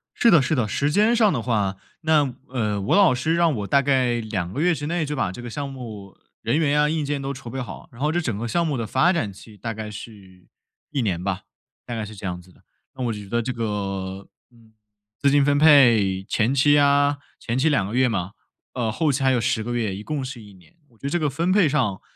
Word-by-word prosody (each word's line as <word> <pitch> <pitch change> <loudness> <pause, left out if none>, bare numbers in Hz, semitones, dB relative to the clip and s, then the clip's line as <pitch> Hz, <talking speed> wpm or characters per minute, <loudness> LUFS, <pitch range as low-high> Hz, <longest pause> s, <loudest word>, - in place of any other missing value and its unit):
是 235 - +4
的 170 -7 +6
是 135 +4 0
的。 120 -5 0
时 145 +7 0
间 215 +7 +3
上 220 -4 +4
的 125 - -1
话， 105 -5 -1 0.2
那， 150 -5 +2
呃， 110 -5 -1
我 95 - +1
老 195 -7 +6
师 155 +6 0
让 170 -2 +3
我 105 -3 -4
大 140 +4 +4
概 130 -3 +1
2 100 -6 -3
个 140 - -2
月 175 +1 +3
之 145 -1 -5
内 170 -1 -1
就 150 +1 -3
把 95 -10 -1
这 110 - -9
个 120 - -7
项 140 +4 -4
目 110 -7 -9 0.3
人 115 +6 0
员 150 -2 +2
啊、 150 0 +3
硬 155 -1 -1
件 145 -1 -2
都 135 0 -3
筹 125 -3 -9
备 135 - -5
好， 110 -7 -9
然 115 - -13
后 150 +1 +1
这 175 - 0
整 120 -10 -2
个 120 - -3
项 170 +8 0
目 150 -4 -1
的 115 - -2
发 130 +11 +3
展 115 - -1
期 105 +2 -15
大 115 +2 -4
概 110 0 -6
是 100 -4 -12 0.5
1 145 -3 -1
年 95 -7 -1
吧， 95 0 -2 0.4
大 120 - -5
概 110 -2 -3
是 110 +1 -10
这 100 - -9
样 90 -1 -4
子 90 +1 -20
的。 - - -25 0.3
那 130 - -4
我 115 - -1
觉 105 -1 -8
得 120 +4 0
这 125 +3 -3
个， 100 -4 -4 0.2
嗯， 115 -2 -23 0.5
资 140 - +3
金 145 0 +4
分 145 0 +2
配， 120 -11 +5
前 115 +3 +1
期 145 +2 +4
啊， 145 0 +3 0.2
前 120 +1 -3
期 140 +5 +3
2 105 -10 +1
个 110 - -5
月 130 0 +4
嘛， 100 -4 -2 0.4
呃， 120 -3 -1
后 150 +7 +1
期 135 0 -1
还 130 - +4
有 125 - +2
10 110 -1 0
个 120 +2 -4
月， 110 -5 -1
一 100 - -7
共 150 +2 -3
是 130 -2 -7
1 105 -1 -14
年。 95 - -21
我 115 - -26
觉 - - -36
得 - - -1
这 175 - +1
个 155 -3 0
分 165 +7 -1
配 195 -3 +4
上 125 -10 0
125 Hz, 265 characters per minute, -23 LUFS, 105-145 Hz, 0.5 s, 的